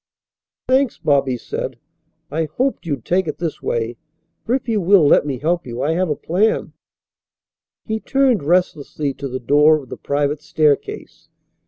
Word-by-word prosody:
"Thanks," 260 -1 +2
Bobby 135 -3 +1
said. - - -5 0.5
"I 160 +1 0
hoped 245 - -2
you'd 140 -7 -3
take 185 0 +1
it 150 - -3
this 165 -3 -4
way, 115 0 -2 0.5
for, 240 - +1
if 265 - -4
you 220 -3 +1
will 185 -2 +5
let 145 - +4
me 135 -3 -2
help, 170 +3 -1
I 125 +6 -2
have 180 +1 0
a 150 - 0
plan." 195 +10 0 1.1
He 220 -1 -2
turned 265 -3 +2
restlessly 150 -3 0
to 140 - -6
the 130 0 -4
door 150 +5 +4
of 130 - -16
the - - -7
private 145 +1 -1
staircase. 155 -2 -1
155 Hz, 160 wpm, -20 LUFS, 140-185 Hz, 1.1 s, will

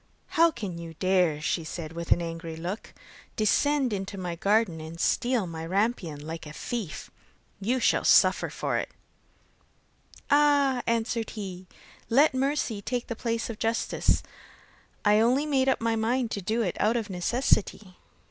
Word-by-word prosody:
'How 335 -1 +5
can 200 - -6
you 165 -1 -8
dare,' 180 -4 +1
said 160 -1 -3
she - - -13
with 170 0 -6
angry 165 -1 -1
look, 175 +6 -6 0.4
'descend 265 +4 +2
into 195 0 -4
my 180 -2 -4
garden 200 -2 +1
and 160 +1 -9
steal 240 0 +1
my 165 -2 -6
rampion 180 -5 -1
like 160 0 -6
a 150 - -9
thief? 215 -2 -5 0.5
You 240 +6 0
shall - - +2
suffer - - +5
for - - -2
it!' - - -4 1.4
'Ah,' 285 -3 +4
answered 230 0 0
he, 185 -3 -6 0.4
'let 280 +5 +5
mercy 260 -5 -1
take 245 +3 -2
the 230 - -5
place 230 0 -2
of 225 -2 -7
justice, 225 +1 +1 0.8
I 210 +1 +5
only 250 +6 +3
made 270 -3 +2
up 265 - +2
my 230 0 +1
mind 230 +2 0
to 200 - -3
do 220 +5 0
it 180 - -2
out 220 +3 +2
of 220 -3 -4
necessity. 190 -1 0
215 Hz, 155 wpm, -27 LUFS, 175-245 Hz, 1.4 s, How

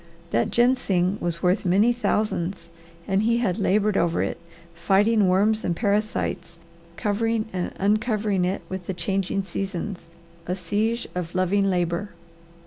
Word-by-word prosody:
That 115 - +1
ginseng 205 -7 +2
was 170 -1 -2
worth 180 +3 +2
many 200 +6 +4
thousands 195 -7 -1 0.4
and 195 0 +2
he 230 +2 +2
had 210 -7 0
laboured 210 +1 +2
over 170 -2 +1
it, - - -3 0.3
fighting 200 +4 +3
worms 210 +4 +2
and 175 - 0
parasites, 200 -4 -1 0.4
covering 220 +3 0
and 180 -1 -2
uncovering 210 -1 +1
it 185 +2 -1
with 190 -2 -6
the 190 - -3
changing 195 +2 -1
seasons, 190 -2 -5 0.4
a 180 - -1
siege 210 +6 -1
of 180 -1 -5
loving 195 +2 +2
labour. 175 +2 -1
195 Hz, 135 wpm, -24 LUFS, 180-215 Hz, 0.4 s, many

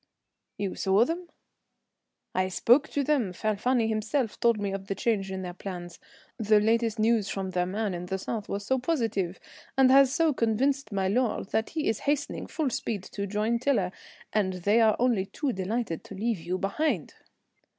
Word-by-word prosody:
"You 200 -2 -2
saw 195 +4 +3
them?" 340 +4 -4 1.0
"I 185 0 +1
spoke 245 +10 +3
to 285 - 0
them. 260 -10 +1
Falfani 220 +4 +1
himself 220 +2 -1
told 235 -2 +3
me 200 -1 -2
of 195 0 -5
the 195 - -2
change 195 -2 0
in 190 0 -4
their 180 -1 -5
plans. 175 -2 -7 0.4
The 215 -1 +4
latest 225 +1 +1
news 220 -2 +2
from 190 -1 -3
their 180 0 0
man 205 +1 -2
in 175 0 -5
the 190 - -2
south 210 +2 -4
was 200 0 -3
so 260 +3 +1
positive, 225 - -1 0.4
and 265 -1 +6
has 270 -1 +7
so 315 +1 +2
convinced 255 +2 0
my 195 -1 0
lord, 225 -1 0
that 220 0 0
he 310 -2 -2
is 220 - +1
hastening 290 -1 -1
full 305 -6 -1
speed 210 -4 -3
to 200 0 -3
join 215 +4 0
Tiler, 230 -9 +1 0.4
and 200 -3 +1
they 205 +6 +2
are 220 -2 +5
only 230 -6 +1
too 280 +2 -2
delighted 195 -2 -2
to 200 - -9
leave 220 0 -1
you 175 +3 -3
behind." 200 - -1
215 Hz, 180 wpm, -28 LUFS, 195-245 Hz, 1.0 s, has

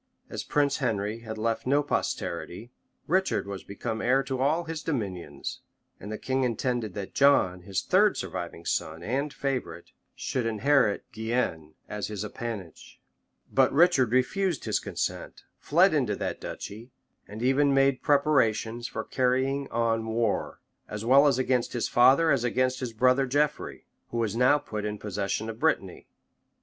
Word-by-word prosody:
As - - -4
Prince 145 -1 +1
Henry 110 -4 -1
had 110 -1 -7
left 115 +2 -2
no 145 +2 +3
posterity, 120 -5 -3 0.3
Richard 190 - +1
was 100 -1 -6
become 110 +2 -5
heir 135 +2 +3
to 135 -1 -4
all 150 +6 +2
his 165 -1 -5
dominions; 105 - -4 0.4
and 105 - -8
the 110 - -3
king 130 0 -1
intended 120 -4 -1
that 100 -2 -6
John, 95 -11 +4
his 95 +1 -3
third 205 +2 +3
surviving 85 -2 -5
son 80 +2 -2
and 135 +8 -1
favorite, 135 -3 -4 0.2
should 125 -3 -2
inherit 115 -1 +2
Guienne 110 -9 -2
as 105 -1 -4
his 105 -1 -5
appanage; 105 -6 -7 0.5
but - - +4
Richard 145 -6 +4
refused 165 +8 +1
his - - +1
consent, - - -4 0.2
fled - - +4
into - - +1
that - - -4
duchy, 110 +5 -7 0.4
and 110 +3 -7
even 140 +2 +3
made 135 -1 +3
preparations 120 -5 +2
for - - -5
carrying 130 +2 0
on 115 -1 0
war, 110 -1 -1 0.3
as 105 +1 -5
well 135 +4 +6
against 130 -2 +1
his 120 - -1
father 135 +7 +5
as 135 -4 +2
against 130 +1 +1
his 125 -3 -4
brother 130 +4 +3
Geoffrey, 145 +3 -1 0.2
who 120 - -4
was 115 -3 -1
now 125 +5 +5
put 110 -8 -5
in 105 0 -3
possession 105 +1 -3
of 115 0 -6
Brittany. 110 - -1
120 Hz, 155 wpm, -27 LUFS, 110-135 Hz, 0.5 s, well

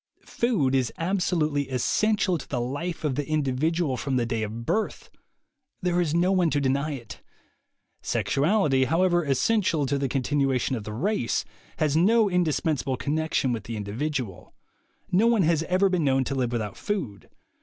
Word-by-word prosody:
Food 195 - 0
is 130 -3 +1
absolutely 165 -6 0
essential 185 - +1
to - - -10
the 125 - -1
life 145 +9 -4
of 150 -3 0
the 145 +2 -3
individual, 150 0 0
from 135 -1 -2
the 120 -2 +1
day 115 -1 -2
of 110 +2 -5
birth. 220 - -2 0.7
There 180 -1 +2
is 165 -4 0
no 175 +2 +3
one 180 -3 +3
to 145 - +1
deny 140 +2 0
it. 120 -4 -9 0.8
Sexualit3% 145 -4 +1
however 175 +4 +2
essential 155 - +1
to 140 +1 0
the 135 -1 -1
continuation 135 -1 0
of 110 -4 -6
the 105 - -5
race, 170 - -1 0.3
has 155 -2 +1
no 215 +6 +4
indispensable 155 -6 0
connection 150 -3 0
with 110 -3 -5
the 115 -1 -5
individual. 110 - -4 0.6
No 200 +6 +4
one 230 -5 +3
has 160 -1 +2
ever 185 +3 +3
been 180 -3 0
known 135 -1 +3
to 140 - -3
live 125 -3 -1
without 110 -4 -3
food. 155 - -4
145 Hz, 165 wpm, -26 LUFS, 130-175 Hz, 0.8 s, no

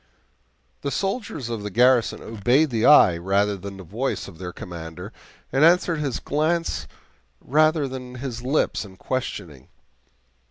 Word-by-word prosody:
The 140 - -2
soldiers 195 - -3
of 115 -3 -3
the 105 - -4
garrison 120 +2 +3
obeyed 120 +7 +2
the 115 -1 +2
eye 90 - +7
rather 100 +3 +1
than 100 +1 -8
the 95 - -9
voice 115 +10 -3
of 85 -4 -13
their 90 -1 -5
commander, 85 -6 -8 0.4
and 135 +3 +2
answered 170 -1 +4
his 140 -4 -2
glance 160 +3 -1 0.5
rather 155 +1 +2
than 125 -1 -7
his 125 -2 -5
lips 130 0 0
in 95 -2 -13
questioning. 85 - -5
125 Hz, 145 wpm, -23 LUFS, 100-145 Hz, 0.5 s, eye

